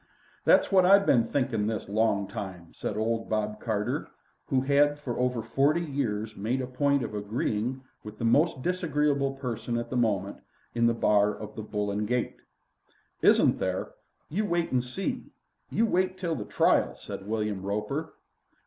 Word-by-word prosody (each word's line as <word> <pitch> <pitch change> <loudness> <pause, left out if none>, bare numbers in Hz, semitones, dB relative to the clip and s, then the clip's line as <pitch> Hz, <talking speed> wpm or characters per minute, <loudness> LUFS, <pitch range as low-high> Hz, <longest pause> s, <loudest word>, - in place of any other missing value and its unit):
"That's - - +5
what 190 -2 +6
I've 200 +2 +6
been 115 -8 +4
thinking 120 -6 0
this 110 -1 -3
long 100 -1 +1
time," 90 -5 -7
said - - -4
old 115 +1 -1
Bob 105 0 -1
Carter, 105 -3 -1 0.4
who 130 - +2
had 145 +2 +3
for 130 -5 -5
over 125 -2 0
forty 140 +8 +2
years 110 -7 -2
made 115 +6 -1
a 130 - -2
point 140 +1 +1
of 115 - -5
agreeing 110 +4 -2 0.2
with 105 - -9
the 115 - -2
most 145 +3 +3
disagreeable 150 -6 0
person 120 -3 -3
at 120 - -4
the - - -2
moment 100 -5 0 0.4
in 115 0 +3
the 115 - +2
bar 105 -2 +3
of 105 - -8
the - - -5
"Bull 105 -1 -2
and 105 +1 -2
Gate." 125 +1 -1 0.8
"Isn't - - +5
there? 95 0 -2 0.4
You 195 +8 -1
wait 170 -6 -1
an' 125 - +3
see. 125 +11 -4 0.4
You 230 - +2
wait 185 -3 +1
till 175 -3 -2
the 110 -9 -4
trial," - - +2
said 95 - -8
William 105 -3 -2
Roper. 105 +11 -3
120 Hz, 170 wpm, -28 LUFS, 105-140 Hz, 0.8 s, what